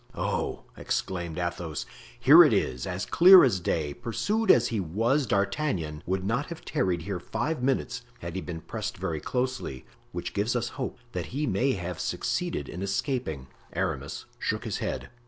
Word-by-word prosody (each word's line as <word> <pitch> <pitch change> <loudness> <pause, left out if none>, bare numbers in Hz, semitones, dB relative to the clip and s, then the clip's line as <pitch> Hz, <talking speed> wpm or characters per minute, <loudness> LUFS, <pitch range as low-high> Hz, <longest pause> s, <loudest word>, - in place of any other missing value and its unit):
"Oh!" - - -2
exclaimed 85 -3 -3
Athos, 85 -3 -3 0.3
"here 145 +8 +9
it 150 - +4
is, 60 0 0
as 90 0 -3
clear 185 +1 +9
as 115 -9 +3
day; 80 -4 -1
pursued 205 - -1
as 120 0 +6
he 115 - -1
was, 115 - +1
D'Artagnan 100 - 0
would 95 +1 0
not 125 +8 0
have 170 -1 -8
tarried 90 - 0
here 95 0 -3
five 150 - -2
minutes 125 -1 0 0.2
had 85 -7 -6
he 95 - -3
been 80 -1 -6
pressed - - -5
very 80 -2 -2
closely, 125 - -3 0.3
which - - -5
gives 105 +5 0
us 120 -1 0
hopes 125 -2 -5
that - - -3
he 145 +4 -2
may 125 +5 +1
have 90 -3 -4
succeeded 70 - -2
in 90 - -6
escaping." 100 - -2 0.3
Aramis - - -3
shook - - -1
his - - -3
head. - - -4
100 Hz, 170 wpm, -28 LUFS, 85-130 Hz, 0.3 s, here